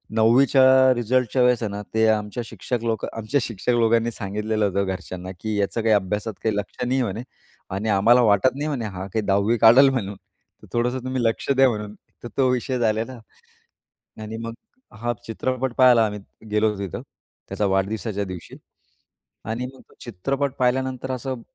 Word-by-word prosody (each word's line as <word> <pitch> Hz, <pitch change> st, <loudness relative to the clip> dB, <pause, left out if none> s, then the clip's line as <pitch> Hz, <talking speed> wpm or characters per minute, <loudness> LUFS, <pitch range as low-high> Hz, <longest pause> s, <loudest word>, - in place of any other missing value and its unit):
9वीच्या 130 Hz, +3 st, +5 dB
रिझल्टच्या 125 Hz, +1 st, +1 dB
वेळेस 125 Hz, -1 st, +3 dB
आहे 110 Hz, -, -1 dB
ना 100 Hz, -, -5 dB
ते 110 Hz, 0 st, +3 dB
आमच्या 110 Hz, +2 st, -1 dB
शिक्षक 115 Hz, +2 st, -4 dB
लोकं 110 Hz, -2 st, -1 dB
आमच्या 115 Hz, +6 st, 0 dB
शिक्षक 115 Hz, +2 st, -2 dB
लोकांनी 115 Hz, 0 st, +2 dB
सांगितलेलं 105 Hz, 0 st, -2 dB
होतं 100 Hz, 0 st, 0 dB
घरच्यांना, 95 Hz, -1 st, -6 dB
की 110 Hz, -1 st, -3 dB
याचं 100 Hz, +3 st, -1 dB
काही 110 Hz, 0 st, +3 dB
अभ्यासात 105 Hz, +2 st, -1 dB
काही 110 Hz, -2 st, +1 dB
लक्ष 105 Hz, +4 st, -4 dB
नाही 130 Hz, +2 st, +1 dB
म्हणे 110 Hz, -1 st, -3 dB, 0.5 s
आणि 105 Hz, +3 st, -2 dB
आम्हाला 115 Hz, +5 st, +5 dB
वाटत 110 Hz, +3 st, +3 dB
नाही 145 Hz, +2 st, -3 dB
म्हणे 135 Hz, -7 st, -2 dB
हा 95 Hz, -2 st, -6 dB
काही 110 Hz, +3 st, -2 dB
10वी 100 Hz, +4 st, +2 dB
काढंल 120 Hz, +5 st, +7 dB
म्हणून. 105 Hz, -7 st, -3 dB, 0.5 s
तर -, -, -13 dB
थोडंसं 125 Hz, +2 st, 0 dB
तुम्ही 130 Hz, -1 st, -2 dB
लक्ष 115 Hz, +3 st, -1 dB
द्या 135 Hz, -1 st, +5 dB
म्हणून, 105 Hz, -2 st, -4 dB, 0.3 s
तर -, -, -5 dB
तो 135 Hz, -2 st, +4 dB
विषय 125 Hz, 0 st, -1 dB
झालेला 115 Hz, +2 st, -1 dB, 1.0 s
आणि 110 Hz, +1 st, -6 dB
मग 115 Hz, 0 st, -5 dB, 0.5 s
हा 120 Hz, 0 st, 0 dB
चित्रपट 130 Hz, +2 st, -2 dB
पाहायला 125 Hz, -3 st, +6 dB
आम्ही 105 Hz, -1 st, -4 dB, 0.3 s
गेलो 105 Hz, 0 st, +1 dB
तिथं 100 Hz, -3 st, -5 dB, 0.5 s
त्याचा 105 Hz, -, -1 dB
वाढदिवसाच्या 100 Hz, +2 st, -1 dB
दिवशी 90 Hz, -3 st, -9 dB, 0.9 s
आणि 115 Hz, +3 st, -3 dB
मग 130 Hz, -, -16 dB
तो -, -, -21 dB
चित्रपट 135 Hz, +6 st, -2 dB
पाहिल्यानंतर 130 Hz, +1 st, 0 dB
असं 130 Hz, -1 st, -4 dB
115 Hz, 165 wpm, -23 LUFS, 105-125 Hz, 1.0 s, काढंल